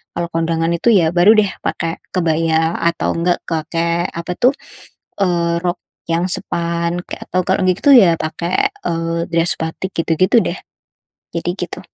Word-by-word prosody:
Kalau 170 Hz, 0 st, -2 dB
kondangan 165 Hz, 0 st, 0 dB
itu, 170 Hz, +7 st, +1 dB
ya, 165 Hz, -4 st, +3 dB
baru, 180 Hz, +5 st, +6 dB
deh, 205 Hz, -2 st, +3 dB, 0.2 s
pakai 165 Hz, 0 st, -2 dB
kebaya 160 Hz, -1 st, +1 dB
atau 170 Hz, 0 st, 0 dB
enggak 175 Hz, +1 st, +1 dB
pakai 170 Hz, +1 st, -1 dB
apa, 170 Hz, +1 st, -6 dB
tuh, 255 Hz, +3 st, +4 dB, 0.7 s
eee, 170 Hz, -2 st, +1 dB
rok 175 Hz, -1 st, -1 dB, 0.3 s
yang 165 Hz, +1 st, +1 dB
span, 170 Hz, +1 st, -2 dB
atau 185 Hz, -, -3 dB
kalau, 190 Hz, +1 st, +1 dB
gitu, 185 Hz, +10 st, +3 dB
ya, 185 Hz, -9 st, +6 dB
pakai, 170 Hz, -, -1 dB, 0.2 s
eee, 165 Hz, 0 st, -1 dB
dress 170 Hz, 0 st, +2 dB
batik, 160 Hz, +4 st, -4 dB
gitu-gitu, 170 Hz, +7 st, +3 dB
deh. -, -, -3 dB, 0.8 s
Jadi 170 Hz, +1 st, -2 dB
gitu. 180 Hz, 0 st, -5 dB
170 Hz, 145 wpm, -18 LUFS, 165-180 Hz, 0.8 s, baru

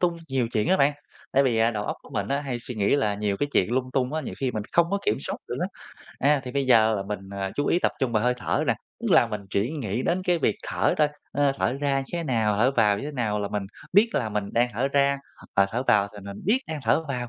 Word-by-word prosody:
tung 175 Hz, -1 st, +2 dB
nhiều 130 Hz, -3 st, 0 dB
chuyện 105 Hz, -, +1 dB
á 190 Hz, -, +4 dB
bạn, 140 Hz, +1 st, +4 dB, 0.4 s
tại 140 Hz, -, +5 dB
vì, 125 Hz, -4 st, +1 dB
à, 115 Hz, +1 st, +4 dB
đầu 105 Hz, -2 st, -3 dB
óc -, -, -3 dB
của -, -, -16 dB
mình 100 Hz, -1 st, -2 dB
hay 140 Hz, -3 st, -2 dB
suy 120 Hz, +1 st, -7 dB
nghĩ 105 Hz, +6 st, +2 dB
là 105 Hz, -7 st, +1 dB
nhiều 100 Hz, -1 st, -1 dB
cái 145 Hz, -, -1 dB
chuyện 95 Hz, +6 st, +2 dB
lung 130 Hz, 0 st, 0 dB
tung 130 Hz, +1 st, 0 dB
á, 160 Hz, -, 0 dB
nhiều -, -, -6 dB
khi 135 Hz, -2 st, 0 dB
mình 110 Hz, -3 st, -3 dB
không 170 Hz, +1 st, +3 dB
có 200 Hz, -, +1 dB
kiểm 110 Hz, -, +3 dB
soát -, -, -4 dB
được -, -, -3 dB
á. -, -, +1 dB, 0.5 s
A, 145 Hz, +1 st, +3 dB
thì 125 Hz, -, -6 dB
bây 140 Hz, -1 st, 0 dB
giờ 110 Hz, -3 st, +5 dB
là 100 Hz, -, -2 dB
mình 105 Hz, 0 st, -4 dB, 0.3 s
chú 145 Hz, -, -1 dB
ý 175 Hz, -, +3 dB
tập -, -, +2 dB
trung 125 Hz, -3 st, 0 dB
vào 110 Hz, 0 st, +2 dB
hơi 125 Hz, 0 st, +2 dB
thở -, -, -1 dB
nè, -, -, +3 dB, 0.3 s
tức -, -, -2 dB
là 120 Hz, -, +6 dB
mình 105 Hz, -2 st, -4 dB
chỉ 100 Hz, +7 st, 0 dB
nghĩ 120 Hz, -5 st, -2 dB
đến 180 Hz, +2 st, 0 dB
cái 175 Hz, -1 st, +2 dB
việc -, -, +1 dB
thở -, -, +1 dB
thôi, 150 Hz, -1 st, +4 dB, 0.2 s
ơ, 140 Hz, -1 st, +2 dB
thở 120 Hz, -, +1 dB
ra 140 Hz, -1 st, 0 dB
như 135 Hz, -, -5 dB
thế 170 Hz, -1 st, -1 dB
nào, 110 Hz, -6 st, +1 dB
thở 120 Hz, +5 st, +4 dB
vào 105 Hz, -6 st, +3 dB
như -, -, -5 dB
thế 150 Hz, -, -5 dB
nào 110 Hz, -5 st, -1 dB
là 100 Hz, -, -2 dB
mình 105 Hz, -1 st, -2 dB, 0.3 s
biết 215 Hz, +4 st, +5 dB
là 110 Hz, -4 st, 0 dB
mình 105 Hz, -1 st, -3 dB
đang 120 Hz, +1 st, +3 dB
thở 130 Hz, +6 st, 0 dB
ra, 140 Hz, 0 st, +2 dB, 0.4 s
và 100 Hz, 0 st, +5 dB
thở 125 Hz, +3 st, -1 dB
vào 100 Hz, -1 st, +4 dB
thì 105 Hz, -, -11 dB
mình 100 Hz, 0 st, -7 dB
biết 235 Hz, +7 st, +3 dB
đang 155 Hz, -2 st, -4 dB
thở 155 Hz, +8 st, +2 dB
vào, 125 Hz, -3 st, -3 dB
125 Hz, 290 wpm, -25 LUFS, 105-140 Hz, 0.5 s, là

